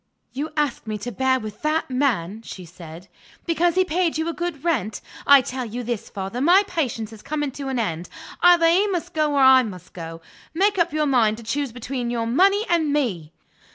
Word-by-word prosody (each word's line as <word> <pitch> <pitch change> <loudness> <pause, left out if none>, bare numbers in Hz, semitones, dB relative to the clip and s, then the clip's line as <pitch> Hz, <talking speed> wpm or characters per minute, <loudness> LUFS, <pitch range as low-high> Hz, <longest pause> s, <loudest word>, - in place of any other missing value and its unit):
"You 290 +4 -4
asked 290 -6 -1
me 215 -1 -3
to 245 +4 -6
bear 260 +4 +1
with 215 -2 -8
that 305 -2 -1
man," 225 -7 0
she 185 -5 -9
said, 170 +1 -12 0.4
"because 340 0 +1
he 370 0 +3
paid 345 -1 0
you 320 +1 -1
a 335 - -2
good 345 -5 -4
rent. 230 - -1 0.3
I 280 -1 +8
tell 255 +1 -5
you 240 +1 -5
this, 235 -2 -4
father; 195 +5 -5
my 360 +7 +5
patience 235 - -3
is 215 - -12
coming 295 +1 -3
to 275 +1 -7
an 265 -1 -2
end. 175 -7 -3 0.3
Either 350 -1 +6
he 370 +5 +3
must 355 -3 -3
go, 305 -2 +1
or - - +3
I 260 0 +7
must 185 -7 -8
go. 165 -1 -8 0.4
Make 395 +2 +2
up 340 0 +2
your 305 0 0
mind 230 -6 +2
to 230 - -10
choose 270 +4 -2
between 245 +1 -4
your 235 -1 -1
money 390 - +3
and 325 -4 +1
me." 200 - -1
265 Hz, 210 wpm, -23 LUFS, 220-320 Hz, 0.4 s, I